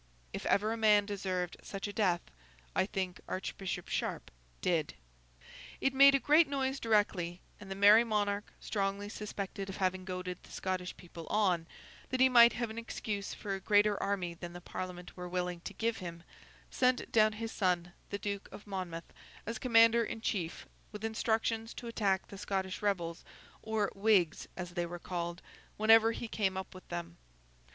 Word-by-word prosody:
If - - -4
ever 215 +2 +2
a - - -4
man 210 -2 +5
deserved 185 -3 -3
such 195 0 -5
a 205 - -6
death, 185 -5 +2 0.5
I 190 - +2
think 185 -3 -3
Archbishop 185 -1 -4
Sharp - - -3 0.3
did. 165 -4 0 0.8
It 270 - +1
made 275 +1 +8
a - - +3
great 305 +3 +5
noise 270 -1 -1
directly, 205 -6 +1 0.2
and 205 -2 -11
the 195 - -4
Merry 205 +3 +7
Monarch—strongly 205 -1 -2
suspected 200 -2 -5
of 190 - -6
having 185 -1 0
goaded 180 -1 -5
the - - -17
Scottish 185 -1 -3
people 170 -2 -10
on, 180 -6 +2 0.4
that 255 - -1
he 260 0 +7
might 235 -1 +8
have 235 -2 -2
an 225 - -5
excuse 210 -3 -4
for 200 -2 -4
a 195 - -3
greater 205 +1 +3
army 190 -3 -1
than 170 0 -8
the 175 - -7
Parliament 180 0 -6
were 180 -1 -6
willing 180 -1 -2
to - - -4
give 230 0 0
him—sent 185 +8 -3
down 215 -1 +5
his 225 +1 -5
son, 175 -3 0 0.2
the 200 - -2
Duke 200 -1 -4
of 205 - -10
Monmouth, 185 -5 -5 0.3
as 230 +1 -4
commander 230 -1 +5
in 225 - -4
chief, 180 -7 -2 0.3
with 210 +1 -6
instructions 225 0 0
to - - -8
attack 205 -5 0
the 200 - -10
Scottish 190 -2 -2
rebels, 175 -5 -1 0.4
or 220 -2 0
Whigs 195 -5 +2
as 180 -1 -5
they 175 -1 -2
were 175 +1 -6
called, 175 0 -4 0.3
whenever 225 +1 +6
he 230 +1 -5
came 195 -4 0
up 190 - -5
with 185 - -13
them. 170 0 -5
200 Hz, 170 wpm, -33 LUFS, 180-220 Hz, 0.8 s, made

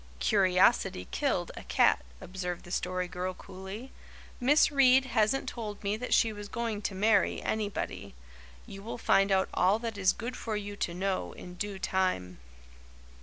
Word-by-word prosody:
"Curiosity 185 - +3
killed - - -1
a - - -7
cat," - - +3 0.2
observed 180 -1 -5
the 175 - -11
Story 180 0 -1
Girl 180 +1 -4
coolly. 195 +8 -9 0.5
"Miss 290 +5 +4
Reade 265 -2 +5
hasn't 240 +2 +1
told 215 -5 -6
me 200 +1 0
that 250 +3 -6
she 225 -2 +4
was 205 0 -8
going 230 -3 -3
to 195 - -3
marry 210 +3 +3
anybody. 210 - -3 0.5
You 195 - -10
will 225 +4 -6
find 195 -3 +3
out 190 0 +3
all 190 +3 +3
that 225 -2 -5
is 185 -1 +4
good 245 +3 -6
for 220 -4 -3
you 205 0 -6
to 175 -3 -3
know 190 +1 -2
in 180 - -10
due 200 +2 -4
time." 185 - -1
200 Hz, 165 wpm, -30 LUFS, 185-225 Hz, 0.5 s, Reade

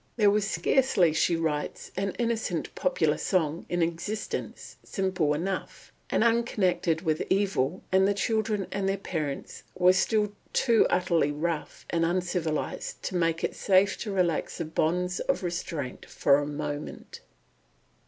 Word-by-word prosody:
"There 210 -3 +5
was 205 -1 +1
scarcely," 180 - +3
she 170 +2 +2
writes, 155 -3 -2
"an 195 0 -2
innocent 235 -2 -1
popular - - +1
song 165 -3 0
in 175 -1 +1
existence, 175 +6 -4
simple 185 -6 0
enough,"... 185 +5 -4 0.2
"and - - +2
unconnected 185 -8 +1
with 155 -3 0
evil, 190 -5 +1
and 190 +1 +5
the 200 - +1
children 215 -1 0
and 195 -1 -1
their 195 - 0
parents 155 -7 -4
were 180 0 +5
still 210 +1 +1 0.2
too 230 -3 +4
utterly 170 -5 +2
rough 155 +1 -3
and 165 -1 +1
uncivilised 175 -2 -2
to 185 - -3
make 165 -1 +1
it - - 0
safe 195 0 +3
to 215 - -4
relax 180 -4 0
the 165 - -3
bonds 180 +3 0
of - - -1
restraint 170 -6 -4
for 140 0 +3
a 145 - -3
moment." 145 0 -5
180 Hz, 145 wpm, -28 LUFS, 160-200 Hz, 0.2 s, There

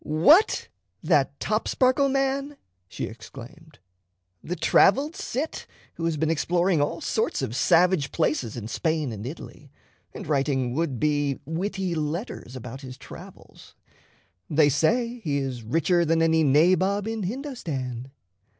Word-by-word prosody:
"What, 235 - +4 0.4
that - - +2
Topsparkle 265 +1 +1
man!" 275 +1 -1 0.3
she - - -5
exclaimed 140 +7 -12 0.7
"the 180 - -3
traveled 275 - +3
Cit 320 -6 -4 0.3
who 165 - -4
has 165 -2 0
been 160 +2 +1
exploring 175 +1 +1
all 145 - -1
sorts - - -1
of 115 - -3
savage 170 -1 +3
places 135 -8 -1
in 110 -2 -5
Spain 155 +2 -1
and 110 +1 -6
Italy, 145 0 -10 0.4
and - - -8
writing 135 -4 0
would 145 -4 -1
be 145 -1 0
witty 185 +3 -2
letters 155 - -4
about 130 +2 -8
his 130 -1 -9
travels. - - -13 0.7
They 150 -1 +4
say 235 - +1
he 145 -4 0
is 135 -3 -3
richer 165 - +1
than 165 0 +2
any 160 0 +3
nabob 185 +8 +3
in 225 -1 -3
Hindostan. 165 - -5
160 Hz, 130 wpm, -25 LUFS, 135-195 Hz, 0.7 s, What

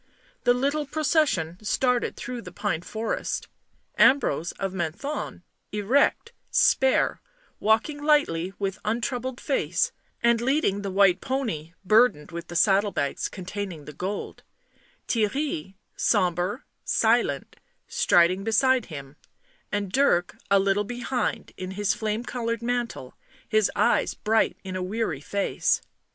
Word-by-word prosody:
The 245 - +6
little 285 +3 0
procession 275 - +1
started 250 +3 +1
through 245 -1 -6
the 180 -4 -10
pine 160 -1 -2
forest; 220 +5 -3 0.5
Ambrose 175 - +4
of 195 -1 -4
Menthon, 190 - -4 0.3
erect, 250 - +2 0.2
spare, - - +3 0.4
walking 225 +8 +1
lightly 190 - +2
with 195 -1 -3
untroubled 240 +3 -2
face 280 - 0 0.3
and 235 -1 +4
leading 255 -6 +1
the 200 - -3
white 195 -1 +4
pony, 225 - -3
burdened 215 -7 +4
with 170 0 -6
the 175 - -8
saddle 195 +3 +4
bags 140 -5 -2
containing 185 -4 -6
the 150 - -9
gold; 190 +7 -5 0.7
Theirry, 215 - -1 0.2
sombre, 180 - +1 0.2
silent, - - +1 0.3
striding 190 - +3
beside 245 +3 +3
him, 140 -2 -9 0.5
and 205 -2 -2
Dirk, 195 -9 +2
a 200 - +5
little 195 +1 +2
behind, 245 +3 -3
in 185 - -5
his 205 +1 +2
flame 215 +1 -2
coloured 230 -2 -3
mantle, 240 - -2 0.3
his 215 -2 +3
eyes - - +2
bright 220 +1 +1
in 190 -1 -6
a 185 - -2
weary 185 -6 -2
face. 200 +6 0
210 Hz, 125 wpm, -26 LUFS, 185-250 Hz, 0.7 s, The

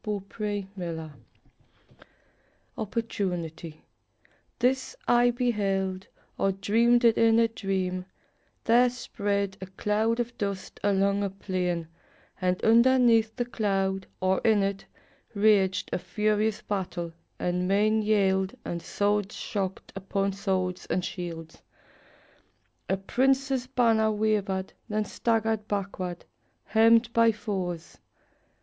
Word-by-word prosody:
OPPORTUNITY* 205 -1 -3
Edward 160 -3 -5 2.0
Rowland 175 -5 -1
Sill 165 -2 -8 0.8
This 260 +1 0
I 240 0 +5
beheld, 195 -6 -1 0.3
or 195 - +2
dreamed 235 +5 +3
it 230 -1 +5
in 225 0 +5
a 230 0 +5
dream: 190 -4 -2 0.6
There 245 +2 +5
spread 200 -5 -2
a 190 - -6
cloud 210 +4 0
of 240 0 -2
dust 200 -2 -4
along 200 0 +2
a 200 - 0
plain, 180 -3 -2 0.5
And 180 0 +1
underneath 230 -1 +5
the 245 - -1
cloud, 195 -5 -1
or 185 0 +2
in 215 -3 +3
it, 195 0 -3 0.5
raged 200 -2 +3
A - - 0
furious 215 +1 0
battle, 180 -4 -3 0.2
and 180 +1 -1
men 215 +3 +3
yelled, 195 -3 +2
and 170 0 -4
swords 205 +3 -1
Shocked 190 -2 -4
upon 195 0 -1
swords 190 -2 -2
and 180 0 -1
shields. 165 -4 -7 1.3
A 190 - +2
prince's 265 +5 +1
banner 230 -4 +3
Wavered, 205 -3 -1 0.2
then 215 0 0
staggered 220 -1 0
backward, 185 -3 -4 0.4
hemmed 230 +1 +4
by 230 0 +5
foes. 190 -6 -5
200 Hz, 110 wpm, -27 LUFS, 190-225 Hz, 2.0 s, I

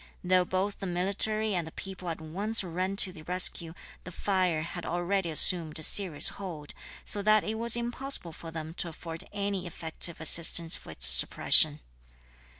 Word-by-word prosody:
Though 180 0 +1
both 190 +3 -4
the 195 - -7
military 200 +4 -1
and 175 -3 -4
the - - -11
people 185 -1 -9
at 165 - -7
once 195 +8 0
ran 185 +2 -5
to 190 -2 -2
the 160 - -14
rescue, 170 -1 -1 0.3
the 180 - -11
fire 180 -4 -2
had 175 +1 -9
already 175 +1 -4
assumed 160 0 +4
a 160 - -7
serious 180 -7 +4
hold, 165 -7 -10 0.3
so 205 - +3
that 215 +1 +1
it 220 +1 -6
was 235 0 +3
impossible 240 -6 -5
for 165 - -12
them 160 0 -9
to 175 - -3
afford 165 0 -11
any 200 -3 -5
effective 165 0 +1
assistance 165 +1 +2
for - - -12
its 65 -5 +4
suppression. 65 - +5
180 Hz, 170 wpm, -26 LUFS, 165-200 Hz, 0.3 s, suppression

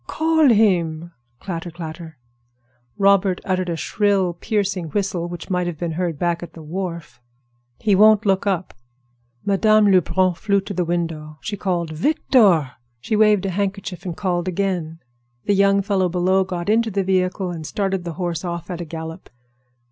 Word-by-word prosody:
"Call 320 -2 +3
him." 175 -7 +2 0.3
Clatter, 175 -2 -5
clatter! 160 -1 -8 0.8
Robert 195 -2 +3
uttered 185 -1 -1
a 170 - -1
shrill, 195 +1 +1
piercing 195 0 -2
whistle 180 0 -2
which 175 +2 -8
might 180 -1 0
have 170 -3 -4
been 170 +1 -3
heard 170 -1 -2
back 170 +1 -1
at 170 -2 -9
the 165 - -11
wharf. 170 -6 -6 0.6
"He 210 -3 +1
won't 215 +2 +5
look 195 0 +1
up." 185 -2 -1 0.7
Madame 210 +1 +4
Lebrun 185 0 +3
flew 200 +3 +1
to 200 +1 -7
the 180 -1 0
window. 165 -3 -3
She 210 - -4
called 175 -4 -2
"Victor!" 185 - +3 0.3
She 165 - -2
waved 210 -2 +4
a 195 - -1
handkerchief 195 -1 -3
and 175 -3 -5
called 175 -2 -1
again. 180 -3 -2 0.5
The 205 - +2
young 200 0 +3
fellow 190 -2 +1
below 185 +2 +2
got 180 -1 -5
into 225 +2 +2
the 200 -1 -1
vehicle 185 0 0
and 165 -2 -6
started 195 +2 -2
the 170 -1 -5
horse 175 -1 -3
off 170 0 -5
at 175 -1 -5
a - - -5
gallop. 160 +2 -8
185 Hz, 165 wpm, -21 LUFS, 170-200 Hz, 0.8 s, won't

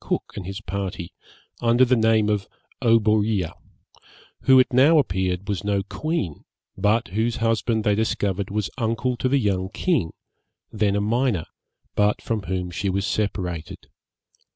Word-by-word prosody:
Cook - - -3
and 95 -3 -6
his 100 +2 -6
party, 95 -4 -5 0.5
under 120 +2 +4
the 130 +1 +3
name 110 -2 +3
of 105 -2 0 0.3
Oberea, 110 -5 +2 0.9
who, 130 -1 +7
it 130 - +3
now 140 +6 +6
appeared, 95 -6 0
was 100 -2 -2
no 100 -1 0
queen, 105 - -3 0.3
but 105 +3 +1
whose 110 +5 0
husband 115 -1 0
they 105 - +3
discovered 100 -2 -1
was 105 -1 -2
uncle 115 +2 0
to 130 - 0
the 140 - +3
young 95 -6 0
king, 150 - 0 0.6
then 105 -2 +1
a 100 - +1
minor, 115 -4 0 0.5
but 105 0 +2
from 115 -2 -2
whom 90 0 -3
she 95 +3 -2
was 95 +1 -1
separated. 90 -7 -3
105 Hz, 150 wpm, -23 LUFS, 95-115 Hz, 0.9 s, who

